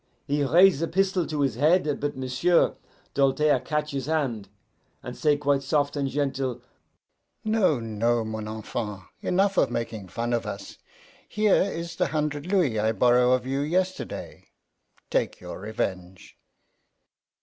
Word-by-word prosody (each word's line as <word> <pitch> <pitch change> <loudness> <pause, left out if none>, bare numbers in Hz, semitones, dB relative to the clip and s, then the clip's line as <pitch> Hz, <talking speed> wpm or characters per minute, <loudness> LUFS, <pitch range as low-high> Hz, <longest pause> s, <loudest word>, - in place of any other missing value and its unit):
He 145 +1 0
raise 170 +2 +5
a 165 - 0
pistol 190 -1 +1
to 150 -2 -2
his 135 -4 +1
head; 150 +3 +2
but 145 -1 -3
M'sieu' 130 +7 +2 0.4
Doltaire 140 +2 +3
catch 150 0 -2
his 135 -1 -4
hand, 130 -11 -1 0.5
and - - -6
say 150 -1 +2
quite 145 -1 +1
soft 145 +1 0
and 140 -2 -1
gentle, 135 -3 -2 0.8
'No, 215 - +2
no, 115 +1 0
mon 110 -1 -5
enfant, 110 -2 -5 0.2
enough 195 +2 +1
of 135 - +4
making 115 -4 -4
fun 120 +6 -3
of 115 - -1
us. - - -7 0.5
Here 215 -1 +3
is 170 -3 -3
the - - +2
hunder' 150 -1 -1
louis 170 - +1
I 110 +1 +1
borrow 125 +2 +4
of 130 0 0
you 135 +1 -1
yesterday. 185 +5 -3 0.6
Take - - 0
your - - -8
revenge. 95 -3 -5
140 Hz, 145 wpm, -26 LUFS, 120-160 Hz, 0.8 s, raise